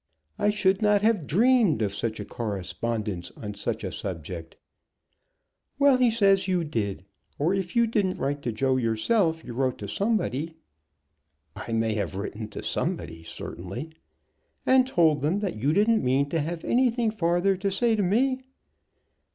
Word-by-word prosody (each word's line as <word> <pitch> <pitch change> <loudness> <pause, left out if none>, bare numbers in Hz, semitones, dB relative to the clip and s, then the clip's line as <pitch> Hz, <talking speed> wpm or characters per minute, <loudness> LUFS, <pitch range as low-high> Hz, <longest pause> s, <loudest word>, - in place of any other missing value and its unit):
I 205 - +3
should 195 -1 +2
not 210 -1 +3
have 210 -9 +2
dreamed 220 - +3
of 100 -2 -1
such 110 +2 -3
a 105 - -5
correspondence 105 -1 -4
on 105 -1 -6
such - - -3
a - - -3
subject." 85 -2 -6 1.2
"Well, 280 -2 +5
he 250 -1 +4
says 200 -4 +3
you 180 -2 +1
did. 105 - -3 0.3
Or, 160 +6 +1
if 190 0 -3
you 235 0 +5
didn't 205 -5 0
write 140 +1 -2
to 120 - -2
Joe 130 +3 +1
himself, 160 - +1
you 120 - -7
wrote 130 +1 0
to 105 - -6
somebody." 165 - -1 1.0
"I - - -7
may 115 -1 +1
have 100 -3 -2
written 105 +2 -5
to 105 - -8
somebody, 80 0 -3
certainly." 95 - -7 0.7
"And 260 0 +5
told 160 - +3
them 155 +7 +1
that 195 - -2
you 135 +7 +1
didn't 215 +6 +3
mean 135 +3 +2
to 165 0 0
have 165 +2 -4
anything 240 -2 +2
farther 180 -1 +1
to 195 +2 -1
say 225 +4 +2
to 210 - 0
me?" 255 +8 +2
165 Hz, 160 wpm, -26 LUFS, -, 1.2 s, Well